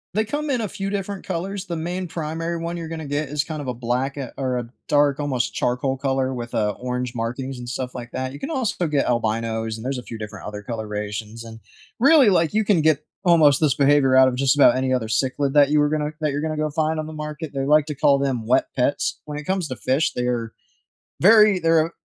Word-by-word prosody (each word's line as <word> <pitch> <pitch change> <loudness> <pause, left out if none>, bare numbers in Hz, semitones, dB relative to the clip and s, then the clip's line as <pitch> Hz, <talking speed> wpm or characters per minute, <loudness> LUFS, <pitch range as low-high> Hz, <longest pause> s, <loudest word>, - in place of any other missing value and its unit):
They 215 +1 +2
come 295 +6 -3
in 255 -3 +1
a 215 - -2
few 195 +1 -4
different 200 -1 -4
colors, 195 +3 -4
the 170 - -3
main 175 +3 -3
primary 165 +1 -3
one 170 +1 -4
you're 165 -1 -5
going 160 -2 -6
get 145 0 -2
is 150 0 0
kind 155 -2 -6
of 135 - -7
a 125 - -2
black, 125 +4 -2
uh, 135 -3 -5
or 130 -2 -1
a 120 -1 -4 0.2
dark, 145 -1 +3
almost 135 -5 -1
charcoal 130 +2 -1
color 135 -1 -1
with, 120 -1 -6
uh, 105 -1 +1
orange 125 0 -3
markings 125 +3 -4
and 120 0 -7
stuff 125 0 -4
like 120 -1 -7
that. 130 +1 -3
You 140 - -9
can - - -5
also 235 - -1
get 145 -2 +1
albinos 110 -1 -1
and 110 - -9
there's 135 -1 -2
a - - -9
few 115 - -8
different 105 -2 -8
other 105 -1 -7
colorations, 110 0 -5
and 115 0 -10 0.4
really, 275 -3 +6
like 165 -2 +2
you 215 -1 +2
can 190 -6 +3
get 155 -1 +2 0.2
almost 160 -5 +5
this 145 -5 +3
behavior 140 -2 +4
out 130 0 +7
of 125 - 0
just 135 +1 +2
about 140 -4 +6
any 130 0 0
other 115 -3 -1
cichlid 135 +5 0
that 145 -1 +5
you 150 0 +3
were 145 0 +3
gonna 150 0 -1
that 150 -2 +1
you're 145 +1 -2
gonna 155 -1 -2
go 155 -1 -1
find 155 +1 0
on 155 - -3
the 155 - -8
market. 150 0 -6
They 135 0 -2
like 150 0 +4
to 150 - -4
call 140 0 +4
them 130 -5 -2
wet 125 - +3
pets. 130 +2 0
When 150 -1 -6
it 150 - -6
comes 185 -1 -1
to 130 - -5
fish, 135 +6 0
they're 120 -2 -2 0.7
very 210 -1 +6
they're 165 -1 +3
a - - -14
140 Hz, 245 wpm, -22 LUFS, 125-160 Hz, 0.7 s, out